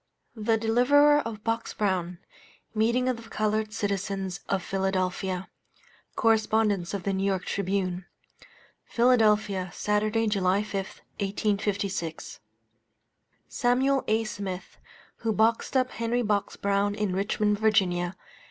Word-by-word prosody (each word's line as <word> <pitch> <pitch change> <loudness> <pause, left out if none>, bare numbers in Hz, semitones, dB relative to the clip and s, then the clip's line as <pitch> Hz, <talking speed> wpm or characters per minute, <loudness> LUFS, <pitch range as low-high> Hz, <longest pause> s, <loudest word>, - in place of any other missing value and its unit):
THE 225 0 +1
DELIVERER 270 +7 +4
OF 225 -6 -5
BOX 230 0 -2
BROWN 180 -4 -1 0.6
MEETING 235 +3 +2
OF 255 -2 0
THE - - -15
COLORED 215 0 -1
CITIZENS 195 -2 -2
OF 195 -2 0
PHILADELPHIA. 190 -1 -1 0.7
[Correspondence 215 -4 +2
of 195 - -4
the 200 - 0
N.Y. 195 0 +1
Tribune.] 185 -2 -2 0.8
PHILADELPHIA, 215 -6 +2
Saturday, 215 +3 0
July 200 -1 +1
5, 210 - -10 0.5
1856. 200 -4 -2 1.1
Samuel 260 +3 +1
A. 220 +1 +2
Smith, 195 -3 -6 0.4
who 225 - -1
boxed 225 +5 +2
up 255 0 +1
Henry 230 +2 -1
Box 205 -2 0
Brown 200 +1 0
in 210 -3 -1
Richmond, 205 +1 0
Va. 185 -5 +2
210 Hz, 110 wpm, -27 LUFS, 195-225 Hz, 1.1 s, DELIVERER